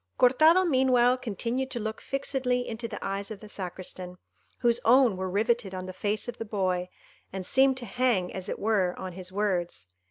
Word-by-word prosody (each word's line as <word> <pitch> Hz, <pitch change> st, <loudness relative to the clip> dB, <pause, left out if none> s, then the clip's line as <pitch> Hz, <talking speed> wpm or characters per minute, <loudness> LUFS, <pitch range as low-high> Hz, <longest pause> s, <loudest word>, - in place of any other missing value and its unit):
Cortado 315 Hz, +9 st, +5 dB
meanwhile 255 Hz, -4 st, +4 dB
continued 250 Hz, +2 st, -3 dB
to 245 Hz, -, -4 dB
look 220 Hz, 0 st, -4 dB
fixedly 260 Hz, -2 st, -1 dB
into 230 Hz, +1 st, -4 dB
the 215 Hz, -2 st, -7 dB
eyes 195 Hz, +1 st, -3 dB
of 215 Hz, -3 st, -7 dB
the 215 Hz, -, -11 dB
Sacristan, 180 Hz, -2 st, -5 dB, 0.4 s
whose 235 Hz, -1 st, +3 dB
own 245 Hz, -3 st, +5 dB
were 185 Hz, 0 st, -3 dB
rivetted 210 Hz, 0 st, 0 dB
on 185 Hz, 0 st, -5 dB
the 185 Hz, -, -7 dB
face 205 Hz, +4 st, -2 dB
of 240 Hz, 0 st, -6 dB
the -, -, -2 dB
boy, 185 Hz, -4 st, -1 dB, 0.4 s
and 190 Hz, -1 st, -5 dB
seemed 265 Hz, +3 st, +4 dB
to 250 Hz, -, -5 dB
hang, 230 Hz, -5 st, 0 dB
as 190 Hz, -1 st, -5 dB
it -, -, -3 dB
were, 200 Hz, -4 st, +1 dB
on 185 Hz, -1 st, -5 dB
his 185 Hz, 0 st, -6 dB
words. 180 Hz, -, -2 dB
215 Hz, 190 wpm, -28 LUFS, 185-250 Hz, 0.4 s, Cortado